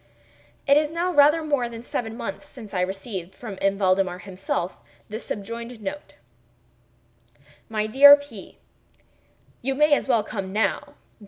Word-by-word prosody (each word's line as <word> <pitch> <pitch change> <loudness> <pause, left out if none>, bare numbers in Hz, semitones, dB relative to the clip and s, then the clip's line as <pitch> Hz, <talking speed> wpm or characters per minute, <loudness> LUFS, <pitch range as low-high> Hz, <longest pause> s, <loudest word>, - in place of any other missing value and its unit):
It 280 +1 +5
is 300 0 +2
now 350 +2 -1
rather 300 +2 +5
more 285 -6 0
than 230 0 -9
seven 225 -2 -4
months 195 +6 -6
since 220 -6 -10
I 180 - 0
received, 190 -1 -5
from 210 -5 -8
M. 195 0 +1
Valdemar 185 -2 +1
himself, 185 -1 -4 0.3
the 215 +1 -5
subjoined 230 +2 -6
note: 215 +8 -7 1.5
MY 215 -1 -1
DEAR 280 +6 +9
P——, 285 -9 -12 1.0
You 270 +2 -1
may 300 +1 +4
as 285 - +1
well 235 -5 +3
come 195 -2 -5
now. 220 +8 -1
225 Hz, 145 wpm, -24 LUFS, 195-285 Hz, 1.5 s, DEAR